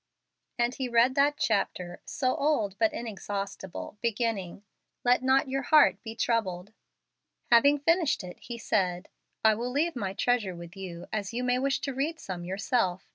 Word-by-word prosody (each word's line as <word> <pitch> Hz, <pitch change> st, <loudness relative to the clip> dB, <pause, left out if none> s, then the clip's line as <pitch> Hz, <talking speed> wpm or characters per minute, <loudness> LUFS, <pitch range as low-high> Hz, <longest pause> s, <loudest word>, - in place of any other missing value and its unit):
And 240 Hz, 0 st, +1 dB
he 260 Hz, -2 st, -3 dB
read 235 Hz, +2 st, +4 dB
that 285 Hz, +2 st, +3 dB
chapter, 180 Hz, -3 st, -1 dB
so 255 Hz, -3 st, 0 dB
old 250 Hz, -10 st, +1 dB
but 220 Hz, -1 st, +3 dB
inexhaustible, 200 Hz, -3 st, -6 dB
beginning, 220 Hz, -5 st, -2 dB, 0.4 s
"Let 245 Hz, 0 st, +4 dB
not 265 Hz, +2 st, +3 dB
your 270 Hz, +1 st, -1 dB
heart 300 Hz, +2 st, +5 dB
be 225 Hz, -1 st, -7 dB
troubled." 210 Hz, -5 st, -1 dB, 0.8 s
Having 280 Hz, +5 st, +6 dB
finished 330 Hz, -, +2 dB
it, 180 Hz, -1 st, -9 dB
he 240 Hz, 0 st, -7 dB
said, 185 Hz, -4 st, -1 dB, 0.4 s
"I 220 Hz, -, +7 dB
will 235 Hz, +3 st, -3 dB
leave 300 Hz, +5 st, 0 dB
my 195 Hz, -6 st, -3 dB
treasure 215 Hz, -4 st, 0 dB
with 170 Hz, +1 st, -10 dB
you, 180 Hz, -3 st, -7 dB
as 210 Hz, +1 st, -3 dB
you 250 Hz, -, -1 dB
may 250 Hz, 0 st, +2 dB
wish 275 Hz, +1 st, 0 dB
to 275 Hz, -, -3 dB
read 305 Hz, +5 st, -2 dB
some 180 Hz, -2 st, -6 dB
yourself. 190 Hz, 0 st, -1 dB
230 Hz, 165 wpm, -28 LUFS, 195-260 Hz, 0.8 s, I